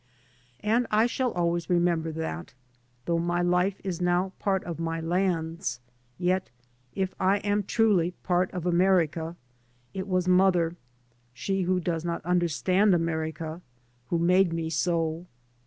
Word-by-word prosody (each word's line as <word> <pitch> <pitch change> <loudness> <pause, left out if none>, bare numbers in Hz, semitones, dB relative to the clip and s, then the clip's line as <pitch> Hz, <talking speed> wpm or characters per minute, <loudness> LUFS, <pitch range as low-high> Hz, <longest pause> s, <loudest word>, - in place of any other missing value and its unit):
And 230 +3 +1
I 215 +2 +4
shall 250 +1 0
always 170 -1 -1
remember 170 -2 +1
that, 120 - -5 0.5
though 170 -1 +1
my 175 +1 0
life 180 +2 +1
is 180 -3 -3
now 180 +2 +1
part 195 -2 0
of 170 -2 -6
my 165 0 -2
land's, 165 -5 -1 0.4
yet, 180 -4 0 0.5
if 190 -1 -1
I 190 +2 +3
am 205 0 +2
truly 195 -4 +2
part 180 0 +1
of 180 -2 -5
America, 170 -2 +2 0.6
it 190 0 -4
was 185 -1 0
mother, 180 -2 +3 0.6
she 195 +8 -1
who 185 0 +3
docs 165 -2 -2
not 170 -2 -3
understand 180 +3 +2
America, 160 0 -3 0.5
who 170 - 0
made 180 +2 +3
me 165 -1 -2
so. 165 +1 -1
175 Hz, 140 wpm, -27 LUFS, 165-190 Hz, 0.6 s, I